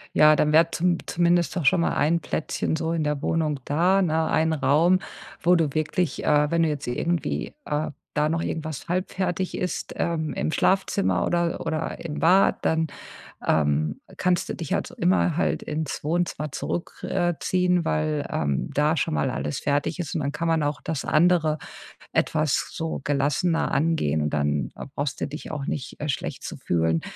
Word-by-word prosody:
Ja, 155 0 +7
dann 150 0 +2
wäre 165 +2 +5
zum 175 +1 +1
zumindest 175 0 +2
doch 175 - -1
schon 170 - +5
mal 170 - +1
ein 170 +3 +2
Plätzchen 160 0 -2
so 160 0 -1
in 165 -2 0
der 150 -1 -1
Wohnung 155 -4 0
da, 175 +6 +3
ne, 160 -2 +1
ein 160 0 +2
Raum, 155 +6 +3 0.4
wo 175 +1 +5
du 160 -5 +1
wirklich, 155 +2 -1
äh, 150 0 +3
wenn 170 0 +2
du 165 - +3
jetzt 145 -2 -3
irgendwie, 165 +8 -2
äh, 150 +1 -1 0.2
da 150 0 +2
noch 165 +1 0
irgendwas 155 -1 -4
halbfertig 185 0 -1
ist, 180 -3 -3
ähm, 160 -2 -1
im - - -1
Schlafzimmer 95 - +1
oder 170 -1 0
oder 160 0 -3
im 150 -3 -4
Bad, 185 +4 +4
dann, 160 0 +1 0.6
ähm, 75 0 +1 0.2
kannst 180 -1 +1
du - - -2
dich 165 - -6
halt - - 0
so - - -11
immer 175 -2 +2
halt - - 0
ins 155 -1 -4
Wohnzimmer 155 -1 -1
zurück, 170 +5 -4
äh, 175 -2 +1
ziehen, 180 -2 +1
weil, 75 0 0
ähm, 70 -1 -1
da 150 +3 +2
schon 100 - 0
mal 75 - +1
alles 75 - -3
fertig 145 +4 0
ist. 175 -4 -4
Und 160 - -1
dann 140 0 -1
kann 165 +3 -3
man 165 -1 +2
auch 145 0 -1
das 160 -4 -3
andere 160 -1 +3 0.6
etwas 155 -3 +1
so 160 0 -3
gelassener 145 +4 +1
angehen. 140 - +1
Und 75 - -1
dann, 75 -1 0
äh, - - -7
brauchst 145 -1 -3
du - - 0
dich 150 +2 -7
auch 150 -3 -4
nicht, 130 - -4
äh, 150 - -3
schlecht 135 - -3
zu - - -6
fühlen, 80 -1 +1
155 Hz, 185 wpm, -25 LUFS, 145-170 Hz, 0.6 s, Ja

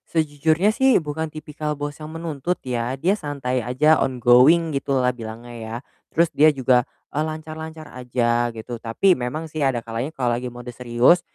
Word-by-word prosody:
Sejujurnya 160 +5 +2
sih 265 +1 +4
bukan 160 0 -3
tipikal 150 -1 -5
bos 145 0 -4
yang 155 - -7
menuntut 165 +1 -3
ya. 125 +1 -2
Dia 175 +8 +2
santai 140 -9 -2
aja, 140 +7 +3
on 130 -1 0
going, 135 +7 +5
gitulah 135 -2 +1
bilangnya 115 +1 -8
ya. 110 0 -6 0.4
Terus 170 +1 +3
dia 155 +2 +6
juga, 130 -3 +3 0.3
eee, 150 - 0
lancar-lancar 155 0 -7
aja, 120 -1 0
gitu. 115 +2 -7
Tapi 120 +12 +3
memang 130 +6 -4
sih 155 0 -5
ada 135 -3 +1
kalanya 115 +4 -3
kalau 125 -3 0
lagi 125 +1 -4
mode 120 0 -9
serius, 125 +8 +3
140 Hz, 170 wpm, -22 LUFS, 120-155 Hz, 0.4 s, dia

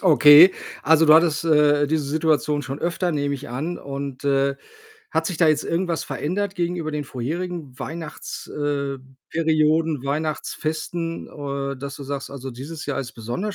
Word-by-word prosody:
Okay. 155 +1 +8 0.3
Also, 160 +2 +5
du 155 - +8
hattest, 160 -1 +4
äh, 150 -2 +4
diese 150 0 0
Situation 150 -1 +1
schon 135 +2 -5
öfter, 175 +1 -1
nehme 145 -1 -1
ich 140 -1 -8
an. 150 +8 -4
Und, 140 -1 -6
äh, 140 0 +2 0.6
hat - - 0
sich 180 -5 -3
da 165 - +5
jetzt 155 -1 +2
irgendwas 170 -1 -1
verändert 195 +5 -2
gegenüber 175 -3 -2
den 150 -1 -2
vorherigen 150 +2 -5
Weihnachts 160 -1 -6
äh, 140 -2 -2 0.3
Perioden, 155 -2 +2
Weihnachtsfesten, 155 +3 -3
äh, 140 -1 -4
dass 140 +1 -6
du - - -8
sagst: 140 0 -5
„Also 135 -1 -7
dieses 145 +6 -8
Jahr 145 - -1
ist 125 -3 -7
besonders 120 - -4
150 Hz, 160 wpm, -23 LUFS, 140-165 Hz, 0.6 s, Okay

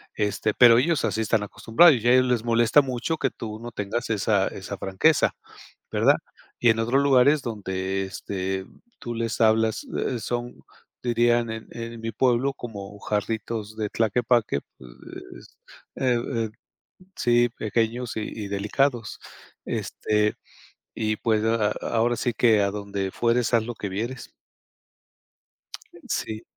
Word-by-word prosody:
este, 105 +1 -1
pero 120 -1 +7
ellos 160 +4 +1
así 110 +1 -1
están 110 -1 +1
acostumbrados 115 - +5
y 120 - -1
a 120 - +6
ellos 130 0 +5
les 125 -3 0
molesta 120 +4 +4
mucho 135 +4 -3
que 135 - 0
tú 110 -2 -7
no 120 +1 -8
tengas 110 +3 -3
esa 100 -2 +1
esa 100 0 -7
franqueza, 95 - +2 0.6
¿verdad?, - - +4 0.4
y 120 - +4
en 115 - +4
otros 120 +5 +2
lugares 140 +1 +4
donde, 95 -4 -3
este, 95 0 -4 0.3
tú, 120 0 -5
les 115 -1 -2
hablas, 110 0 +2
eh, 125 - -1
son, 120 +2 -3 0.5
dirían 120 -1 +2
en 110 0 -7
en 115 0 -7
mi 115 0 -3
pueblo, 125 +4 +1
como: 105 -5 -8
"Jarritos 110 +1 -3
de 105 -1 -2
Tlaquepaque", 115 - +1 0.2
pues, 60 -1 -13 0.4
eh, 125 -2 +1 0.2
eh, 115 -1 -1 0.7
sí, 120 0 +3
pequeños 115 +3 -1
y - - -1 0.2
y - - -5
delicados, 110 +4 -1 0.5
este, 105 0 -1 0.6
y 110 -1 -1
pues 110 -2 +1
a 115 -2 +2
a - - -4 0.2
ahora 120 +1 +2
sí 120 +1 -1
que: 110 -2 +4
"A 100 - +2
donde 100 -1 -4
fueres, 120 +2 +1
haz 115 -2 +4
lo 120 - -4
que 100 - -5
vieres". 115 +7 -5 1.8
Sí, 110 0 -3
115 Hz, 145 wpm, -25 LUFS, 105-120 Hz, 1.8 s, pero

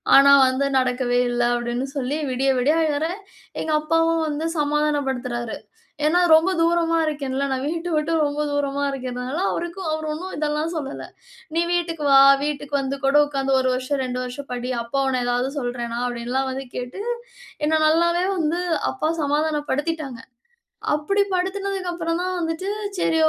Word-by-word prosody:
ஆனா 280 0 +8 0.2
வந்து 260 +2 0
நடக்கவே 250 -1 +1
இல்ல 240 0 0
அப்படின்னு 240 +2 -2
சொல்லி, 275 +2 -1
விடிய 265 +2 0
விடிய 290 +5 +3
அழுறேன். 315 +5 -1 0.4
எங்க 315 - -2
அப்பாவும் 330 +1 +2
வந்து 300 +2 -2
சமாதானப்படுத்துறாரு. 270 -6 -1 0.5
ஏன்னா 340 +4 +4
ரொம்ப 320 +4 +6
தூரமா 335 0 +2
இருக்கேன்ல. 280 -2 -2
நான் 260 0 -1
வீட்ட 335 +2 -3
விட்டு 305 +2 0
ரொம்ப 290 +1 -2
தூரமா 285 0 -1
இருக்கிறனால 255 +2 -4
அவருக்கும் 345 +1 -4
அவர் 315 0 -2
ஒண்ணும் 365 +5 -6
இதெல்லாம் 300 +2 -1
சொல்லல. 285 -4 -5 0.5
நீ 335 - +2
வீட்டுக்கு 330 -3 -1
வா! 270 0 +8 0.2
வீட்டுக்கு 290 -1 -4
வந்து 270 +1 -2
கூட 275 +2 +3
உட்காந்து 270 -1 -2
1 260 - +1
வருஷம், 260 +2 -2
2 250 -1 -3
வருஷம் 250 +2 -7
படி. 245 0 -3
அப்பா 275 +4 -2
உன்ன 255 -2 0
ஏதாவது 245 +2 0
சொல்றேனா? 240 -2 -3
அப்படின்லாம் 245 +2 -2
வந்து 270 +1 -4
கேட்டு, 250 +10 -5 0.6
என்ன 315 +1 +2
நல்லாவே 340 +3 +3
வந்து 335 +2 0 0.3
அப்பா 320 -5 -1
சமாதானப்படுத்திட்டாங்க. 295 -2 -1 0.7
அப்டிபடுத்தினதுக்கப்புறம் 370 0 -1
தான் 370 0 -2
வந்துட்டு, 325 +4 -2 0.3
சரி 325 - +2
290 Hz, 145 wpm, -23 LUFS, 260-330 Hz, 0.7 s, ஆனா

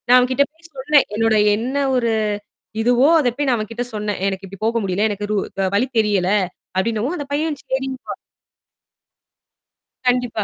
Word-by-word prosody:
நான் 250 +1 +7
அவன் 250 0 +3
கிட்ட 280 +2 +4
போய் 325 +1 -15
சொன்னேன். 280 +2 +3
என்னோட 225 0 +2 0.2
என்ன 245 +6 -3 0.2
ஒரு 235 -2 +1 0.7
இதுவோ, 245 +4 +4
அத 260 -5 +2
போய் 290 -1 0
நான் 250 -2 +3
அவன் 215 -1 -4
கிட்ட 235 +2 -3
சொன்னேன், 210 -1 -2
"ஏய்! 195 - +1
எனக்கு 195 0 -5
இப்படி 195 0 -11
போக 230 +1 +1
முடியல. 195 +3 +1
எனக்கு 205 0 -3
ரூ 210 - +1 0.4
வழி 240 +6 +2
தெரியல." 205 -4 +2 0.5
அப்படீன்னவும் 225 - 0
அந்தப் 285 -4 -7
பையன் 305 0 -1
சரிங்க 265 0 -3
பா - - -3 1.9
கண்டிப்பா. 245 -3 +1
235 Hz, 175 wpm, -20 LUFS, 210-265 Hz, 1.9 s, நான்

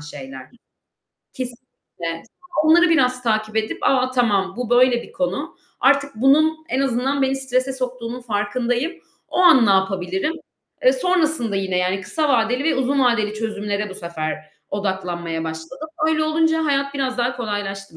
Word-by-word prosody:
şeyler. 135 -3 -10 0.8
Kesinlikle. 240 -10 -7
Sonra 345 -4 -2
onları 345 +1 +6
biraz 255 -5 +2
takip 215 -2 -1
edip, 220 0 -1
a, 255 -1 +2
tamam, 200 -7 +1
bu 245 -1 -4
böyle 245 -1 +4
bir - - -14
konu. 280 +3 -3 0.2
Artık 280 +1 +3
bunun 310 +5 +3
en 260 - 0
azından 270 +1 0
beni 265 0 +1
strese 265 0 -1
soktuğunun 250 -2 -4
farkındayım. 240 - -1 0.4
O - - -5
an 325 - +7
ne - - +4
yapabilirim? 190 - 0 0.5
E, - - +6
sonrasında 315 - +1
yine 190 -2 -1
yani 185 +2 0
kısa 290 +11 -1
vadeli 245 +1 +2
ve 320 - +2
uzun 265 +2 +1
vadeli 215 -3 +1
çözümlere 210 -1 -3
bu - - -8
sefer 155 -3 -5 0.3
odaklanmaya 180 -4 -3
başladım. 160 - -7 0.2
Öyle 310 -1 +1
olunca 320 +1 +1
hayat 280 -1 0
biraz 260 -2 -2
daha 240 +1 0
kolaylaştı 195 -5 -5
245 Hz, 150 wpm, -21 LUFS, 195-275 Hz, 0.8 s, an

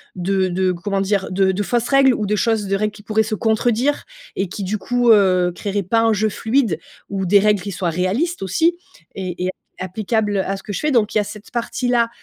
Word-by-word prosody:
de 190 +1 0
de, 185 +1 +1
comment 195 +3 -2
dire, 195 0 0
de 190 0 +2
de 195 +2 -2
fausses 240 +3 -1
règles 275 -1 +5
ou 215 -3 -2
de 210 - +1
choses 220 -1 0
de 195 - +1
règles 210 +1 0
qui 210 - -13
pourraient 215 +1 +1
se 215 +1 -4
contredire 235 +5 +1 0.3
et 195 - -1
qui 195 +3 -6
du 200 +3 -2
coup, 245 +3 0
heu, 185 -4 +4
créeraient 200 0 -2
pas 225 +6 +2
un 225 -1 +3
jeu 215 +1 +1
fluide 220 - 0 0.3
ou 195 -1 -2
des 200 +3 +5
règles 210 -1 +2
qui 200 - -5
soient 180 -1 -2
réalistes 195 - -1
aussi, 325 - +1 0.4
et 180 -2 -4
et - - 0
app - - -1 0.3
applicables 205 +2 -1
à 195 +1 -1
ce 195 - -10
que - - -6
je 200 - -3
fais. 300 - 0
Donc 225 -5 +2
il - - +2
y - - +4
a - - -4
cette 210 +1 -10
partie-là, 240 0 0
205 Hz, 240 wpm, -20 LUFS, 190-225 Hz, 0.4 s, règles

